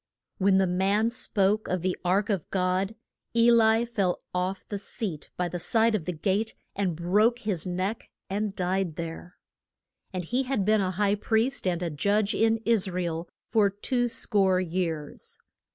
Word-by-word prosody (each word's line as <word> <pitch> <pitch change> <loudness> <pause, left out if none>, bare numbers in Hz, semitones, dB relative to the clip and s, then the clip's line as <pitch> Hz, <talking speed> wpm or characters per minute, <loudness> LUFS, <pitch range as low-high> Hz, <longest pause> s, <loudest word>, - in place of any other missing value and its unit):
When 190 0 +4
the 190 - +4
man 195 +5 +1
spoke 215 -4 +1
of 180 -2 -2
the 185 -1 0
ark 195 +4 +1
of 190 -6 -2
God, 190 +2 0 0.4
E 235 +1 +6
li 225 0 +4
fell 200 -7 -1
off 185 +1 -2
the 205 - -4
seat 195 -7 -3
by 180 - 0
the 175 +1 -4
side 225 +5 +3
of 195 -7 -1
the 180 - -1
gate, 195 +6 -1 0.2
and 190 -4 0
broke 205 +8 +2
his 205 -9 -2
neck, 185 +5 -3 0.2
and 205 +1 -2
died 185 -2 -1
there. 170 +2 -7 0.7
And 180 -3 -4
he 245 +8 0
had 260 -7 -1
been 215 0 +3
a 185 - 0
high 200 +2 +1
priest 225 +3 0
and 175 -1 0
a 170 - -2
judge 200 +7 +1
in 225 0 +3
Is 220 -4 +3
ra 180 0 -2
el 165 0 -4 0.2
for 210 -3 +3
two 245 +5 -1
score 190 -5 +2
years. 165 -4 -3
195 Hz, 175 wpm, -27 LUFS, 180-220 Hz, 0.7 s, E